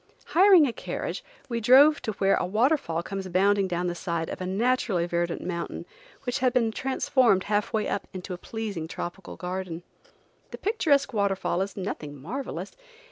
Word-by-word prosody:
Hiring 370 Hz, -3 st, +7 dB
a 245 Hz, -, -2 dB
carriage -, -, -5 dB, 0.2 s
we 235 Hz, -2 st, -2 dB
drove 275 Hz, +6 st, +6 dB
to 220 Hz, -3 st, -3 dB
where 195 Hz, 0 st, +2 dB
a -, -, +1 dB
waterfall 215 Hz, -, +1 dB
comes 195 Hz, 0 st, -5 dB
bounding 195 Hz, +2 st, +3 dB
down 175 Hz, 0 st, -2 dB
the 175 Hz, -, -1 dB
side 170 Hz, -2 st, -3 dB
of -, -, -6 dB
a 185 Hz, -, -3 dB
naturally 205 Hz, -3 st, +1 dB
verdant 170 Hz, 0 st, -2 dB
mountain 170 Hz, -1 st, -4 dB, 0.4 s
which 245 Hz, -2 st, -2 dB
has 255 Hz, -1 st, +3 dB
been 230 Hz, -3 st, +2 dB
transformed, 255 Hz, -4 st, +2 dB
half 205 Hz, 0 st, 0 dB
way 215 Hz, -1 st, 0 dB
up, 200 Hz, -, -3 dB
into 185 Hz, 0 st, -6 dB
a -, -, -5 dB
pleasing 205 Hz, -8 st, -5 dB
tropical 175 Hz, +3 st, -6 dB
garden. 180 Hz, -2 st, -5 dB, 0.7 s
The -, -, -8 dB
picturesque 300 Hz, -, +1 dB
waterfall 195 Hz, -3 st, 0 dB
is 195 Hz, +1 st, -4 dB
nothing 150 Hz, -7 st, -5 dB
marvelous. 245 Hz, -, -5 dB
200 Hz, 170 wpm, -26 LUFS, 180-245 Hz, 0.7 s, Hiring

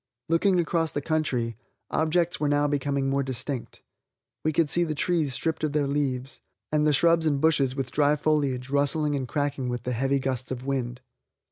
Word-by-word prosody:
Looking 180 Hz, +3 st, +3 dB
across 165 Hz, -1 st, 0 dB
the -, -, -2 dB
country, 135 Hz, -7 st, -1 dB, 0.3 s
objects 170 Hz, +2 st, +1 dB
were 150 Hz, -, +1 dB
now 145 Hz, 0 st, +2 dB
becoming 140 Hz, -1 st, 0 dB
more 140 Hz, +1 st, +1 dB
distinct. 130 Hz, 0 st, -4 dB, 0.6 s
We 155 Hz, -, +2 dB
could 160 Hz, 0 st, +2 dB
see 175 Hz, +4 st, +2 dB
the 155 Hz, -2 st, -2 dB
trees 150 Hz, -3 st, 0 dB
stripped 160 Hz, -1 st, -2 dB
of 150 Hz, -1 st, 0 dB
their 150 Hz, -1 st, +2 dB
leaves, 135 Hz, -2 st, -2 dB, 0.3 s
and 150 Hz, 0 st, +2 dB
the -, -, +4 dB
shrubs 165 Hz, +2 st, +3 dB
and 145 Hz, -2 st, +1 dB
bushes 140 Hz, -4 st, +2 dB
with 135 Hz, -1 st, -3 dB
dry 145 Hz, 0 st, +3 dB
foliage 140 Hz, -4 st, 0 dB
rustling 145 Hz, +1 st, +2 dB
and 135 Hz, -3 st, -2 dB
cracking 140 Hz, -1 st, -2 dB
with 120 Hz, -1 st, -3 dB
the 125 Hz, -, -2 dB
heavy 135 Hz, +3 st, +1 dB
gusts 130 Hz, -1 st, -2 dB
of 130 Hz, 0 st, -5 dB
wind. 125 Hz, -3 st, -2 dB
145 Hz, 190 wpm, -26 LUFS, 130-155 Hz, 0.6 s, the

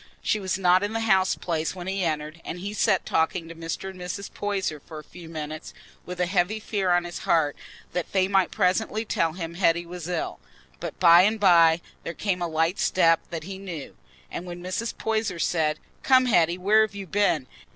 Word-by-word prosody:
She 215 Hz, -, +1 dB
was 190 Hz, -2 st, -1 dB
not 185 Hz, -1 st, +4 dB
in 205 Hz, +2 st, -2 dB
the 225 Hz, -, -1 dB
house 190 Hz, -4 st, +3 dB
place 165 Hz, 0 st, -2 dB
when 180 Hz, -1 st, -7 dB
he 190 Hz, 0 st, -1 dB
entered, 155 Hz, 0 st, -3 dB
and 170 Hz, -, -5 dB
he 200 Hz, +3 st, -5 dB
sat 190 Hz, -3 st, +2 dB
talking 165 Hz, +1 st, 0 dB
to 165 Hz, -, -8 dB
Mr. 165 Hz, +3 st, -5 dB
and 185 Hz, -, -14 dB
Mrs. 180 Hz, +3 st, -6 dB
Poyser 195 Hz, -7 st, -2 dB
for 155 Hz, +2 st, -11 dB
a 155 Hz, -, -8 dB
few 170 Hz, +1 st, -12 dB
minutes 155 Hz, -1 st, -7 dB, 0.3 s
with 180 Hz, 0 st, -6 dB
a 180 Hz, -, +2 dB
heavy 185 Hz, +4 st, 0 dB
fear 200 Hz, -3 st, -1 dB
on 175 Hz, 0 st, +3 dB
his 175 Hz, 0 st, -6 dB
heart 155 Hz, -3 st, +1 dB, 0.4 s
that 180 Hz, -, -3 dB
they 190 Hz, -1 st, +2 dB
might 195 Hz, -2 st, +2 dB
presently 215 Hz, +4 st, 0 dB
tell 165 Hz, -6 st, 0 dB
him 165 Hz, -1 st, -5 dB
Hetty 170 Hz, -1 st, +2 dB
was 175 Hz, -1 st, -7 dB
ill. 175 Hz, -3 st, -3 dB, 0.4 s
But -, -, -6 dB
by 170 Hz, -1 st, +8 dB
and 215 Hz, +4 st, +2 dB
by 170 Hz, -4 st, +5 dB, 0.2 s
there 165 Hz, -, -6 dB
came 185 Hz, -1 st, -1 dB
a 175 Hz, -, 0 dB
light 165 Hz, +3 st, 0 dB
step 165 Hz, -3 st, +4 dB
that 165 Hz, -3 st, -5 dB
he 190 Hz, +2 st, -7 dB
knew, 170 Hz, -7 st, -7 dB, 0.4 s
and 180 Hz, -, -6 dB
when 175 Hz, 0 st, -7 dB
Mrs. 185 Hz, +6 st, -3 dB
Poyser 220 Hz, -5 st, -1 dB
said, 155 Hz, -2 st, +1 dB, 0.2 s
"Come, 255 Hz, -1 st, +5 dB
Hetty, 175 Hz, -7 st, +3 dB
where 205 Hz, +4 st, +4 dB
have 215 Hz, -2 st, 0 dB
you 200 Hz, -1 st, -6 dB
been?" 180 Hz, -7 st, +1 dB
180 Hz, 210 wpm, -25 LUFS, 165-195 Hz, 0.4 s, by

